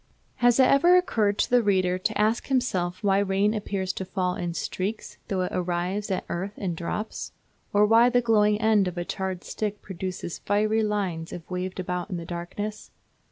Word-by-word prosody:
Has 245 +1 +4
it - - +8
ever 340 +8 +6
occurred 215 - +1
to - - +1
the 245 -1 +5
reader 185 -3 +1
to 215 +3 -1
ask 215 +2 +1
himself 185 -8 0
why 195 -1 +3
rain 200 +1 +2
appears 195 -3 -2
to - - -4
fall 185 -1 -1
in 175 -1 -4
streaks 200 +6 -4
though 190 -2 -1
it 180 - -3
arrives 180 +3 -2
at 190 - -2
earth 190 +4 -4
in 185 -3 -2
drops? 175 +6 -4 0.4
Or 205 +1 +5
why 230 +3 +6
the 245 0 +3
glowing 210 -3 +3
end 215 -3 +3
of 180 0 -5
a 175 - -2
charred 190 -1 -4
stick 210 -1 -4
produces 185 -2 -5
fiery 215 +2 +1
lines 195 -6 -2
if 165 - -8
waved 185 +1 -3
about 180 -1 -3
in 180 - -3
the 170 - -6
darkness? 185 +5 -5
195 Hz, 190 wpm, -26 LUFS, 180-215 Hz, 0.4 s, it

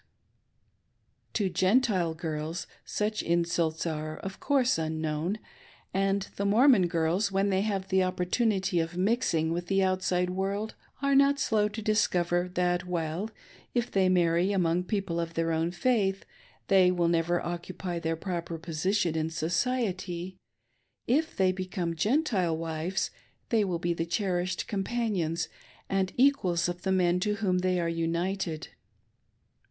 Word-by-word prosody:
To 205 -3 +1
Gentile 190 -3 +2
girls 160 +1 -4 0.2
such 210 0 -1
insults 170 -1 0
are 155 -1 -3
of 195 0 -7
course, 260 - +2
unknown, 160 +3 -2 0.6
and 195 +1 +1
the 200 - -1
Mormon 215 -1 +5
girls, 170 +4 +1
when 195 +1 +1
they 190 0 +2
have 195 -2 -2
the 190 0 +3
opportunity 185 +1 +1
of 165 +2 -2
mixing 180 -6 +1
with 175 +1 -3
the 195 -1 +2
outside 185 -1 +1
world, 195 +3 -2 0.3
are 280 0 +3
not 280 +1 +5
slow 215 -5 +2
to 215 +1 -6
discover 180 -4 +1
that 180 0 +1
while, 175 +3 -2 0.5
if 240 0 0
they 190 -2 +3
marry 175 +1 +3
among 180 -2 +1
people 195 -5 -2
of 165 -1 -3
their 165 0 0
own 165 +1 +1
faith, 195 +1 0 0.4
they 190 -2 +5
will 175 -2 +1
never 170 +1 +2
occupy 175 0 -4
their 165 0 -1
proper 170 -1 -4
position 170 +2 0
in 160 0 0
society, 185 0 -1 0.7
if 315 +7 +1
they 190 -1 +4
become 185 -2 -3
Gentile 205 - +1
wives 165 +3 -2 0.4
they 225 -2 +3
will 180 -4 -1
be 170 0 -1
the 165 0 -3
cherished 180 0 -1
companions 195 -6 -1 0.4
and 190 -1 0
equals 245 -12 +3
of 175 0 -4
the 190 - -1
men 180 -1 +3
to 210 +2 0
whom 190 -4 +1
they 185 0 +1
are 170 - 0
united. 165 0 -2
180 Hz, 140 wpm, -29 LUFS, 170-200 Hz, 0.7 s, Mormon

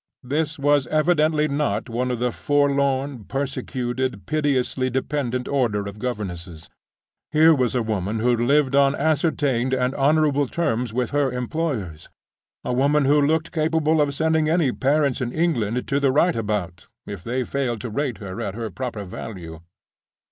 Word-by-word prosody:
This 150 +4 -2
was 145 -2 +2
evidently 155 0 +2
not 145 0 -1
one 125 +2 -2
of 125 - -1
the 125 +1 0
forlorn, 140 -4 0
persecuted, 130 -3 -3
pitiably 135 -4 0
dependent 130 -1 -2
order 115 -7 0
of 100 +1 -8
governesses. 90 -9 -5 0.6
Here 160 +1 +6
was 130 -4 0
a 120 - +1
woman 105 -1 -2
who 120 +2 +2
lived 135 +3 +2
on 140 0 +4
ascertained 140 -4 +1
and 125 0 0
honorable 145 0 +2
terms 120 -7 -1
with 125 +1 -2
her 145 -2 +1
employers—a 125 - -5
woman 140 +3 +2
who 145 +2 +4
looked 160 +3 +1
capable 160 -1 +1
of 140 -1 0
sending 160 0 +1
any 160 -5 +2
parents 140 0 +1
in 120 -1 -2
England 125 -8 0
to 140 - +2
the 140 -2 +2
right 165 +5 +3
about, 100 -6 -3 0.2
if 100 -4 -7
they 125 +2 -1
failed 125 -3 -2
to 120 - -5
rate 130 -1 -2
her 95 -2 -7
at 95 - -4
her 115 -1 -4
proper 120 -5 -5
value. 90 -4 -8
130 Hz, 155 wpm, -23 LUFS, 115-150 Hz, 0.6 s, Here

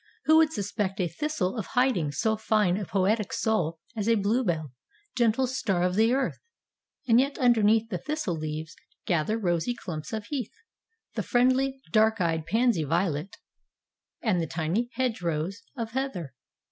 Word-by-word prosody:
Who 315 +1 +6
would 320 -1 +5
suspect 205 -4 -2
a 180 - +1
thistle 190 - -2
of 220 -5 -4
hiding 245 - +2
so 220 +10 +1
fine 215 -4 +2
a 200 0 -3
poetic 200 +3 +1
soul 170 -7 0 0.2
as 215 0 -1
a 230 - +5
bluebell, 200 - 0 0.4
gentle 240 +1 +3
star 210 -8 0
of 180 0 +1
the 220 +4 +3
earth? 265 +1 0 0.7
And 230 0 +6
yet 275 +2 +1
underneath 225 -2 +3
the 180 - -2
thistle 300 - -2
leaves 155 +1 -5 0.3
gather 175 +5 +1
rosy 180 +3 0
clumps 155 -8 -6
of 220 -1 -4
heath, 260 -5 -4 0.6
the - - -2
friendly, 265 +2 +2
dark 220 0 +4
eyed 165 -2 0
pansy 225 -3 +2
violet 165 +2 -1 0.9
and 185 -8 +2
tiny 175 +9 -1
hedgerows 190 -6 -2 0.2
of 225 -2 -3
heather. 230 - -3
210 Hz, 150 wpm, -27 LUFS, 175-240 Hz, 0.9 s, Who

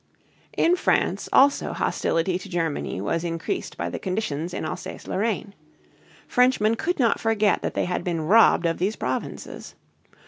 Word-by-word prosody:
In 345 +2 +4
France 360 - 0
also 280 +1 +4
hostility 175 +2 0
to 195 - -10
Germany 165 - -2
was 165 - -1
increased 170 - -4
by - - -2
the - - -4
conditions 180 -5 -3
in - - -4
Alsace 155 - -6
Lorraine. 205 0 -2 0.7
Frenchmen 250 -3 +3
could 325 +10 -1
not 235 -4 +2
forget 215 -2 +2
that - - -3
they - - 0
had 180 -1 -2
been 170 -2 -2
robbed 205 -1 +5
of 165 -1 0
these 195 +5 0
provinces. 130 +1 -5
190 Hz, 150 wpm, -24 LUFS, 165-225 Hz, 0.7 s, robbed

